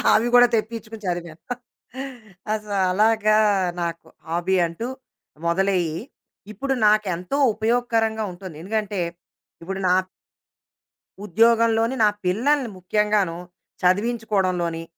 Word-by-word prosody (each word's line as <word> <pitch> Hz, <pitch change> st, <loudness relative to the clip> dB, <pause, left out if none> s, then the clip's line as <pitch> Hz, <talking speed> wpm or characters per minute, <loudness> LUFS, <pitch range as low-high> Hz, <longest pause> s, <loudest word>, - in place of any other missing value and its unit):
అవి 225 Hz, +2 st, +2 dB
కూడా 245 Hz, 0 st, +8 dB
తెప్పించుకొని 220 Hz, 0 st, -4 dB
చదివాం. 170 Hz, -2 st, -3 dB, 1.2 s
అస 215 Hz, -1 st, -3 dB, 0.3 s
అలాగా 215 Hz, +2 st, +3 dB, 0.4 s
నాకు 170 Hz, -1 st, -4 dB, 0.2 s
హాబీ 175 Hz, +3 st, 0 dB
అంటూ. 170 Hz, +9 st, -5 dB, 0.6 s
మొదలయ్యి, 175 Hz, -2 st, +1 dB, 0.5 s
ఇప్పుడు 270 Hz, +6 st, -2 dB
నాకెంతో 210 Hz, +2 st, +1 dB, 0.2 s
ఉపయోగకరంగా 225 Hz, 0 st, 0 dB
ఉంటొంది. 180 Hz, -2 st, -9 dB
ఎందుకంటే, 210 Hz, -1 st, -2 dB, 0.6 s
ఇప్పుడు 190 Hz, +3 st, -4 dB
నా 180 Hz, -, +4 dB, 1.3 s
ఉద్యోగంలోని 230 Hz, +3 st, +3 dB
నా 210 Hz, -, +6 dB, 0.2 s
పిల్లల్ని 250 Hz, +8 st, +1 dB
ముఖ్యంగాను, 200 Hz, -2 st, +1 dB, 0.5 s
చదివించుకోవడంలోని. 185 Hz, -4 st, +1 dB
210 Hz, 90 wpm, -23 LUFS, 180-225 Hz, 1.3 s, కూడా